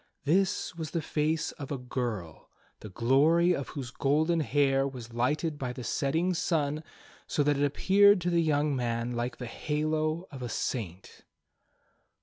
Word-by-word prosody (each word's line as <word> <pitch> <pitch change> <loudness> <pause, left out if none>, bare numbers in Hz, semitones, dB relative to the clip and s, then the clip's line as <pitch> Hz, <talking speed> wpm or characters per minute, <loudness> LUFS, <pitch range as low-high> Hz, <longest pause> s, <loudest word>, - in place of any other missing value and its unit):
This 185 +6 +1
was 160 -3 -5
the 165 - -2
face 155 +1 0
of 140 - -6
a 140 - -1
girl, 120 -9 -5 0.3
the 105 - -9
glory 145 - +3
of 140 -5 -3
whose 135 -4 -6
golden 155 +6 +1
hair 135 -1 +2
was 120 -4 -8
lighted 145 +6 0
by 125 -2 -3
the 125 - -7
setting 160 +8 0
sun, 155 -3 0 0.4
so 145 - +1
that 145 0 +2
it - - +2
appeared 200 +7 +5
to 175 +1 0
the 170 -1 +3
young 150 -2 +1
man 120 -1 -1
like 120 +1 -3
the 125 - -6
halo 155 +5 -1
of 135 -3 -8
a 120 - -4
saint. 95 -7 -4
145 Hz, 160 wpm, -29 LUFS, 125-160 Hz, 0.4 s, appeared